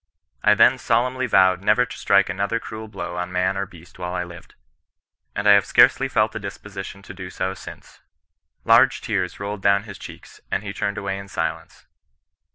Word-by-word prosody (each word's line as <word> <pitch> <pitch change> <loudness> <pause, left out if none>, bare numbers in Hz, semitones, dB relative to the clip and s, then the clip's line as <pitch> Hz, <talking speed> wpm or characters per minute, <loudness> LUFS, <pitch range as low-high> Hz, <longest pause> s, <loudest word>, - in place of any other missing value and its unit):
I 105 - +5
then 130 +5 +5
solemnly 125 +3 0
vowed 95 -4 +4
never 125 +5 +3
to 125 - -9
strike 100 0 +3
another 100 +5 -1
cruel 110 -1 -8
blow 90 -4 -6
on 90 0 -3
man 90 +1 0
or 100 0 -2
beast 85 +1 -16
while 90 0 -4
I 90 - -1
lived. 85 -1 -12 0.8
And 100 - -1
I - - +8
have 100 -1 +6
scarcely - - +4
felt - - +1
a - - -4
disposition 100 0 -8
to - - -10
do 95 -1 -8
so 95 0 -3
since.' - - -12 0.7
Large 120 +3 +5
tears 95 -5 -2
rolled 100 0 -5
down 100 +1 +3
his 100 -3 -10
cheeks, - - -12
and - - -1
he 100 -1 -5
turned 100 +2 -3
away 100 -1 -3
in 100 - -9
silence. - - -5
100 Hz, 190 wpm, -22 LUFS, 95-110 Hz, 0.8 s, I